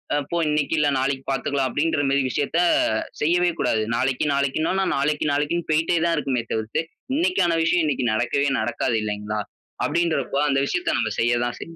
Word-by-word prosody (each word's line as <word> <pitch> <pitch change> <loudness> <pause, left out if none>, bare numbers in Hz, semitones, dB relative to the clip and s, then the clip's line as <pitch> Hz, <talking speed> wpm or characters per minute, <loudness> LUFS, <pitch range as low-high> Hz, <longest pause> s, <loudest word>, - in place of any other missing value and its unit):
"அ - - +2
போ, 170 - 0
இன்னைக்கு 150 +1 0
இல்ல, 150 - +3
நாளைக்கு 135 0 -1
பாத்துக்கலாம்." 135 0 0
அப்டின்றமாரி 145 -1 +1
விஷயத்தை, 155 +6 0 0.6
செய்யவே 175 +3 +3
கூடாது. 110 - +1
நாளைக்கு, 130 +3 0
நாளைக்குனோனா, 155 +7 0
நாளைக்கு, 150 +2 0
நாளைக்குனு 150 +4 -1
போயிட்டே 165 +2 +2
தான் 170 - +2
இருக்குமே 130 -5 -1
தவிர்த்து, 110 +8 -2 0.3
இன்னைக்கான 235 - +2
விஷயம் 165 +1 +2
இன்னைக்கு 140 -4 -1
நடக்கவே 120 +5 +1
நடக்காது, 115 0 -1
இல்லைங்களா? 105 0 -3 0.5
அப்டின்றபோ, 160 -5 0
அந்த 135 - +2
விஷயத்தை 180 - -1
நம்ம 110 -2 0
செய்ய 120 +1 +2
தான் 120 - -3
செய் 165 - -9
140 Hz, 160 wpm, -23 LUFS, 125-165 Hz, 0.6 s, இல்ல